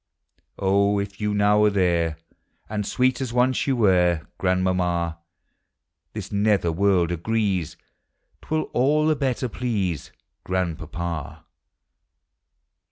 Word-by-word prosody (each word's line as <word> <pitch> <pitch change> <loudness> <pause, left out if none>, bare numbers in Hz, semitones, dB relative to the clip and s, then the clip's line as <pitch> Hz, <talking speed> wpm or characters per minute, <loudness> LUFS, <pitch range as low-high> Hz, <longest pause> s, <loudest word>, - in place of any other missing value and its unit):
Oh, 100 +1 +2
if 100 +1 -4
you 105 0 0
now 105 +1 +4
are - - +5
there, 85 -5 +1 0.5
And 105 -1 -3
sweet 130 0 +1
as 130 -3 -3
once 125 +3 +1
you 135 - +2
were, 90 -7 +3
Grandmamma, 90 -3 0 0.9
This - - -6
nether 100 -4 +2
world 90 -1 +2
agrees 95 -1 -1 0.7
'T - - -18
will 155 0 +1
all 150 +5 +3
the 155 0 +3
better 130 -3 -1
please 105 - -2 0.3
Grandpapa. 85 -3 -4
100 Hz, 110 wpm, -24 LUFS, 85-115 Hz, 0.9 s, are